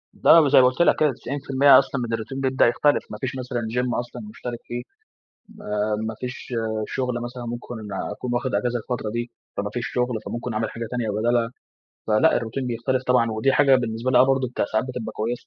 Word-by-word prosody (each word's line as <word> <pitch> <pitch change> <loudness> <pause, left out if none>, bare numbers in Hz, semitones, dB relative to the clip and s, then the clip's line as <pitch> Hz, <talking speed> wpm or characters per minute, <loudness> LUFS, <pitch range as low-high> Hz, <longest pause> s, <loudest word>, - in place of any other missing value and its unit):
ده 165 - +7
وزي 140 -3 +6
ما - - +5
قلت 130 +6 0
لك - - +5
كده، 150 -2 +4
90% 135 +1 +4
أصلًا 135 -1 -2
من 115 -1 -3
الروتين 115 +4 -4
بيبدأ 130 -2 +3
يختلف. 145 +5 +2
ما - - -5
فيش 130 -2 -1
مثلًا 125 -2 -3
gym 125 -1 0
أصلًا 120 +10 -6
مشترِك 120 - -6
فيه، 120 0 -4 0.7
ما 105 0 -2
ما 110 - -4
فيش 125 0 -6 0.3
شغل 125 -2 -2
مثلًا، 120 0 -6
ممكن 120 +1 -6 0.4
أكون 120 +3 -4
واخد 130 +1 -1
أجازة 120 -1 0
الفترة 110 -1 -4
دي، 120 +2 -4 0.3
فما 100 +1 -1
فيش 120 -1 -2
شغل، 125 -2 -1
فممكن 120 0 -4
أعمل 110 +1 -1
حاجة 115 0 -6
تانية 120 -3 -2
بدالها. 115 +2 +1 0.6
فلأ، 110 +9 +4
الروتين 120 +3 -3
بيختلف 125 +2 -1
طبعًا 125 -2 +3
ودي 110 +5 +1
حاجة 140 -2 +5
بالنسبة 115 0 -2
لي 125 - +5
آه، - - +8
برضه 135 -1 +1 0.2
ساعات 110 +3 +1
بتبقى 125 -3 -5
كويسه. 115 +3 -3
120 Hz, 200 wpm, -23 LUFS, 115-130 Hz, 0.7 s, آه